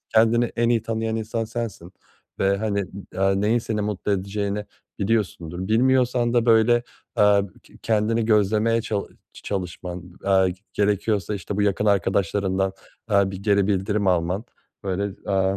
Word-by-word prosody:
kendini 115 Hz, +2 st, +5 dB
en 120 Hz, 0 st, 0 dB
iyi 115 Hz, -2 st, +2 dB
tanıyan 115 Hz, 0 st, -2 dB
insan 115 Hz, +1 st, -2 dB
sensin 110 Hz, -6 st, -6 dB, 0.5 s
ve, 100 Hz, 0 st, +2 dB
hani, 100 Hz, -2 st, -1 dB, 0.3 s
aaa, 95 Hz, 0 st, +3 dB
neyin 105 Hz, +4 st, +2 dB
seni 110 Hz, -2 st, -2 dB
mutlu 105 Hz, -1 st, -2 dB
edeceğini 100 Hz, +1 st, -2 dB, 0.3 s
biliyorsundur. 95 Hz, -4 st, -1 dB
Bilmiyorsan 125 Hz, 0 st, +3 dB
da, 120 Hz, 0 st, +3 dB
böyle, 115 Hz, +1 st, +5 dB, 0.4 s
eee, 105 Hz, -1 st, +5 dB, 0.2 s
ke -, -, -19 dB
kendini 110 Hz, +1 st, +1 dB
gözlemeye 110 Hz, +1 st, +2 dB
çalı 105 Hz, -3 st, -3 dB, 0.2 s
çalışman, 90 Hz, -2 st, -6 dB
aaa, 95 Hz, -1 st, +4 dB, 0.2 s
gerekiyorsa, 105 Hz, -1 st, 0 dB
işte, 95 Hz, +1 st, -5 dB
bu 105 Hz, -, +1 dB
yakın 105 Hz, +1 st, +1 dB
arkadaşlarından, 95 Hz, 0 st, +1 dB, 0.4 s
aaa, 100 Hz, -2 st, +3 dB
bir 95 Hz, 0 st, -7 dB
geri 100 Hz, -2 st, +3 dB
bildirim 100 Hz, +1 st, 0 dB
alman, 90 Hz, +4 st, +1 dB, 0.4 s
böyle, 100 Hz, +1 st, -2 dB, 0.2 s
aaa, 95 Hz, 0 st, +2 dB
105 Hz, 140 wpm, -23 LUFS, 95-110 Hz, 0.5 s, kendini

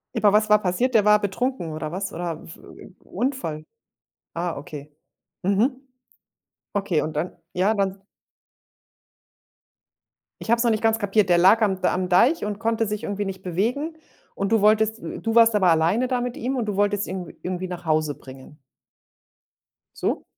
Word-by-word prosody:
Aber 205 Hz, -1 st, +3 dB
was 215 Hz, 0 st, +3 dB
war 210 Hz, 0 st, +5 dB
passiert? 230 Hz, +7 st, 0 dB
Der 210 Hz, -1 st, +5 dB
war 210 Hz, 0 st, +6 dB
betrunken 200 Hz, -3 st, -2 dB
oder 155 Hz, 0 st, -5 dB
was? 190 Hz, +2 st, -4 dB
Oder 170 Hz, -2 st, -5 dB
v 165 Hz, -, -11 dB, 0.2 s
äh, -, -, -13 dB
Unfall? 195 Hz, -, -3 dB, 0.7 s
Ah, 170 Hz, 0 st, -3 dB
okay. 150 Hz, -1 st, -9 dB, 0.5 s
Mhm. 235 Hz, +8 st, +1 dB, 0.9 s
Okay, 195 Hz, -6 st, 0 dB
und 155 Hz, -, -4 dB
dann 155 Hz, +5 st, -3 dB, 0.2 s
ja, 195 Hz, +5 st, +2 dB
dann 195 Hz, -1 st, -2 dB, 2.4 s
Ich -, -, -8 dB
habe 235 Hz, -, +5 dB
es 235 Hz, -, 0 dB
noch 235 Hz, -, +3 dB
nicht 215 Hz, -, 0 dB
ganz 225 Hz, 0 st, +2 dB
kapiert, 205 Hz, -1 st, +2 dB
der 175 Hz, -, +5 dB
lag 195 Hz, +6 st, +5 dB
am 190 Hz, -3 st, +1 dB
D 180 Hz, -, +2 dB
am 185 Hz, 0 st, -1 dB
Deich 230 Hz, -, +3 dB
und 205 Hz, 0 st, -4 dB
konnte 225 Hz, 0 st, 0 dB
sich 210 Hz, 0 st, -4 dB
irgendwie 205 Hz, 0 st, -3 dB
nicht 190 Hz, -1 st, -6 dB
bewegen. 245 Hz, -, -2 dB, 0.4 s
Und 200 Hz, +2 st, -2 dB
du 220 Hz, -, +3 dB
wolltest 220 Hz, +1 st, +3 dB
hm, -, -, -7 dB
du 225 Hz, 0 st, -2 dB
warst 230 Hz, -1 st, +6 dB
aber 195 Hz, -3 st, +3 dB
alleine 170 Hz, +10 st, +2 dB
da 250 Hz, -1 st, -1 dB
mit 245 Hz, -1 st, -4 dB
ihm 260 Hz, +3 st, -2 dB
und 240 Hz, -3 st, -1 dB
du 210 Hz, -, -3 dB
wolltest 205 Hz, 0 st, +1 dB
ihn 185 Hz, -2 st, -5 dB
w -, -, -12 dB
irgendwie 185 Hz, 0 st, -3 dB
nach 175 Hz, -1 st, -7 dB
Hause 155 Hz, -2 st, +1 dB
bringen. 135 Hz, +2 st, -13 dB, 1.4 s
So? -, -, -2 dB
200 Hz, 180 wpm, -23 LUFS, 175-225 Hz, 2.4 s, war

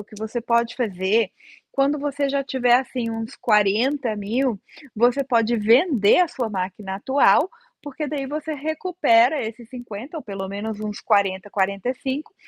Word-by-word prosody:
o -, -, -9 dB
que 215 Hz, -, -16 dB
você 220 Hz, +3 st, -4 dB
pode 235 Hz, 0 st, +1 dB
fazer, 205 Hz, -2 st, 0 dB, 0.4 s
quando 280 Hz, +2 st, +1 dB
você 285 Hz, 0 st, -1 dB
já 275 Hz, 0 st, -1 dB
tiver, 250 Hz, -3 st, +2 dB
assim, 250 Hz, -2 st, 0 dB
uns 225 Hz, 0 st, -6 dB
40 220 Hz, +4 st, +2 dB
mil 220 Hz, +2 st, -1 dB, 0.3 s
você 240 Hz, +5 st, +3 dB
pode 235 Hz, -2 st, +2 dB
vender 230 Hz, -, +4 dB
a 355 Hz, -, +3 dB
sua 245 Hz, -7 st, -3 dB
máquina 190 Hz, 0 st, -4 dB
atual, 280 Hz, -, +3 dB, 0.3 s
porque 295 Hz, +1 st, -5 dB
daí 280 Hz, -2 st, -3 dB
você 305 Hz, +2 st, -4 dB
recupera 300 Hz, -4 st, +2 dB
esses 230 Hz, +1 st, -9 dB
50 245 Hz, +3 st, -8 dB
ou 310 Hz, -, -5 dB
pelo 195 Hz, -2 st, -6 dB
menos 205 Hz, +2 st, -5 dB
uns 210 Hz, -1 st, -5 dB
40, 200 Hz, -2 st, +1 dB
45 245 Hz, +9 st, -2 dB
235 Hz, 155 wpm, -22 LUFS, 210-275 Hz, 0.4 s, vender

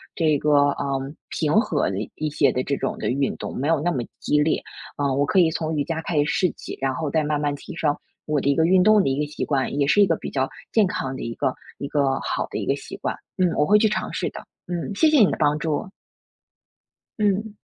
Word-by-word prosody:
这 155 Hz, -3 st, +2 dB
个， 150 Hz, +2 st, 0 dB, 0.2 s
啊， -, -, -4 dB, 0.5 s
平 150 Hz, -1 st, -1 dB
和 170 Hz, -, +2 dB
的 95 Hz, -, -3 dB, 0.2 s
一 155 Hz, -, -2 dB
些 140 Hz, -2 st, +3 dB
的 125 Hz, -, -1 dB
这 140 Hz, -, -1 dB
种 -, -, -2 dB
的 -, -, -1 dB
运 135 Hz, +2 st, 0 dB
动， -, -, -6 dB
没 140 Hz, -, -1 dB
有 165 Hz, -2 st, +3 dB
那 175 Hz, +4 st, 0 dB
么 130 Hz, -7 st, -2 dB, 0.2 s
激 150 Hz, -, +1 dB
烈。 155 Hz, +1 st, +1 dB, 0.4 s
啊， 140 Hz, -1 st, 0 dB
我 140 Hz, +2 st, +2 dB
可 190 Hz, -, +2 dB
以 170 Hz, -3 st, +5 dB
从 160 Hz, 0 st, -2 dB
瑜 145 Hz, -, +1 dB
伽 160 Hz, -1 st, -3 dB
开 165 Hz, -, -2 dB
始 145 Hz, -, +3 dB
试 180 Hz, +3 st, +1 dB
起， -, -, -9 dB
然 135 Hz, -1 st, +1 dB
后 150 Hz, +3 st, -2 dB
再 155 Hz, +2 st, +1 dB
慢 150 Hz, 0 st, 0 dB
慢 145 Hz, -1 st, 0 dB
提 -, -, -10 dB
升， 150 Hz, -3 st, +1 dB, 0.3 s
我 150 Hz, -1 st, +1 dB
的 -, -, -2 dB
一 140 Hz, -, +3 dB
个 160 Hz, -, +3 dB
运 185 Hz, +1 st, +5 dB
动 215 Hz, +1 st, +6 dB
的 135 Hz, -, +1 dB
一 135 Hz, +1 st, -1 dB
个 150 Hz, -, +1 dB
习 -, -, -4 dB
惯， 135 Hz, -3 st, 0 dB
也 140 Hz, -, +2 dB
是 205 Hz, -, +5 dB
一 -, -, +7 dB
个 170 Hz, -3 st, +1 dB
比 -, -, -6 dB
较 130 Hz, -1 st, 0 dB, 0.2 s
健 220 Hz, -2 st, +4 dB
康 135 Hz, -7 st, -3 dB
的 -, -, -6 dB
一 115 Hz, -, -4 dB
个 130 Hz, -, -1 dB, 0.2 s
一 140 Hz, -, -4 dB
个 140 Hz, -2 st, +1 dB
好 -, -, -2 dB
的 -, -, -3 dB
一 -, -, -3 dB
个 -, -, +2 dB
习 -, -, -9 dB
惯。 -, -, -3 dB, 0.2 s
嗯， 185 Hz, -1 st, +3 dB
我 150 Hz, -, +3 dB
会 210 Hz, +6 st, +5 dB
去 220 Hz, -, +4 dB
尝 215 Hz, -, -2 dB
试 -, -, -1 dB
的， -, -, -9 dB, 0.3 s
嗯， 175 Hz, +3 st, -3 dB
谢 315 Hz, +9 st, +4 dB
谢 305 Hz, -, +4 dB
你 210 Hz, -, +6 dB
的 -, -, -2 dB
帮 150 Hz, -1 st, +3 dB
助。 155 Hz, +3 st, -2 dB, 1.3 s
嗯。 210 Hz, +1 st, 0 dB
150 Hz, 280 characters per minute, -23 LUFS, 140-175 Hz, 1.3 s, 一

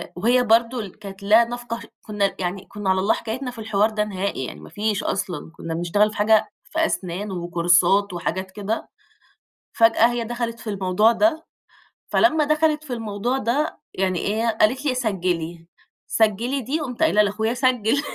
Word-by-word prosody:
وهي 245 Hz, +7 st, +3 dB
برضو 235 Hz, +2 st, +3 dB
ال 205 Hz, -2 st, -8 dB
كانت 200 Hz, -1 st, -10 dB
لا 220 Hz, +4 st, +6 dB
نَفْقه 240 Hz, -1 st, -5 dB, 0.2 s
كُنا 205 Hz, -2 st, -1 dB
يعني، 185 Hz, +1 st, -3 dB
كُنا 205 Hz, -2 st, -4 dB
على 190 Hz, 0 st, +3 dB
الله 200 Hz, +3 st, +3 dB
حكايتنا 250 Hz, +3 st, -4 dB
في 235 Hz, -, -12 dB
الحوار 215 Hz, 0 st, +1 dB
ده 210 Hz, -1 st, -1 dB
نهائي 195 Hz, -9 st, -3 dB
يعني 75 Hz, -, -8 dB
ما 75 Hz, -, -12 dB
فيش 210 Hz, -1 st, -1 dB
أصلًا، 175 Hz, -4 st, -3 dB
كُنا 165 Hz, 0 st, -6 dB
بنشتغل 175 Hz, +6 st, +2 dB
في -, -, -10 dB
حاجة 215 Hz, +1 st, +3 dB
في 325 Hz, 0 st, 0 dB
أسنان 190 Hz, -, -3 dB
وكورسات 175 Hz, +3 st, +2 dB
وحاجات 190 Hz, +2 st, -3 dB
كده، 210 Hz, +3 st, -4 dB, 0.8 s
فجأة 230 Hz, 0 st, +5 dB
هي 240 Hz, -1 st, -2 dB
دخَلِت 235 Hz, 0 st, -4 dB
في 220 Hz, -, -7 dB
الموضوع 200 Hz, +3 st, +3 dB
ده، 320 Hz, +5 st, +1 dB, 0.7 s
فلمّا 320 Hz, -3 st, +4 dB
دخَلِت 305 Hz, 0 st, +2 dB
في 265 Hz, -5 st, -6 dB
الموضوع 225 Hz, +3 st, -2 dB
ده، 270 Hz, +6 st, -1 dB
يعني 185 Hz, -2 st, 0 dB
إيه 220 Hz, +3 st, -1 dB
قالت 225 Hz, +6 st, +1 dB
لي 255 Hz, -3 st, +1 dB
سجّلي، 175 Hz, -7 st, -2 dB, 0.4 s
سجّلي 230 Hz, +5 st, +1 dB
دي 275 Hz, +7 st, -2 dB
قمت 260 Hz, 0 st, -3 dB
قايلة 210 Hz, -9 st, +4 dB
لاخويا 220 Hz, +3 st, 0 dB
سجّل، 255 Hz, 0 st, +1 dB
215 Hz, 170 wpm, -23 LUFS, 195-240 Hz, 0.8 s, لا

